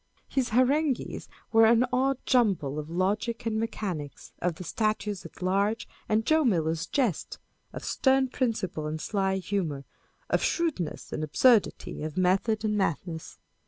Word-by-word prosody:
His 260 -3 0
harangues 260 +4 +1 0.2
were 225 0 +6
an 235 +2 +5
odd 265 +1 +2
jumble 190 - +2
of 150 +1 -7
logic 205 +7 -1
and 220 -1 0
mechanics, 185 - -4
of 175 -2 -1
the 185 - -8
Statutes 215 -1 -2
at - - -12
Large 200 +4 +1 0.2
and 220 +1 +2
Joe 315 0 +4
Miller 165 - +2 0.2
jests, 245 - 0 0.3
of - - -7
stem 265 0 +3
principle 215 - -2
and 155 +1 -3
sly 195 +2 0
humour, 180 -8 -2 0.4
of - - +1
shrewdness 300 - -1
and 155 - -2
absurdity, 220 - +2
of 155 +1 -5
method 195 +4 +2
and 210 -1 +1
madness. 165 -3 -2
210 Hz, 145 wpm, -28 LUFS, 175-235 Hz, 0.4 s, were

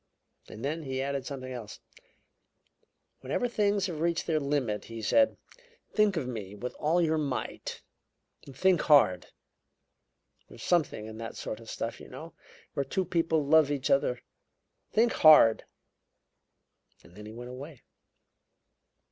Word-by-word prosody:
And 110 +4 -7
then 155 +4 -2
he 135 -3 -4
added 140 0 -2
something 130 -2 -6
else: 115 -4 -8 1.4
'Whenever 245 - -1
things 205 -4 +1
have 170 -6 -4
reached 170 +1 0
their 160 -2 +1
limit,' 140 -8 -1
he 115 0 -8
said, 280 - +3 0.6
'think 210 -3 +3
of 135 -6 -2
me 105 -5 -6
with 125 +5 -6
all 160 +4 +2
your 160 -1 +1
might. 140 -4 -4 0.7
Think 180 +5 +2
hard! 135 - +4 1.2
There's - - -12
something 160 -11 +1
in 110 0 -9
that 115 0 -6
sort 110 - -5
of 115 - -12
stuff, 115 - -4
you - - -11
know, 155 +6 -10 0.4
where 140 - -1
two 190 +6 -2
people 165 -3 +1
love 155 0 +5
each 145 -2 -1
other. - - +1 0.7
Think 230 +2 +3
hard!' 150 -8 +7 1.4
Then 105 +4 -12
he - - -8
went 120 +2 -8
away." 135 +2 -10
145 Hz, 140 wpm, -29 LUFS, 120-165 Hz, 1.4 s, hard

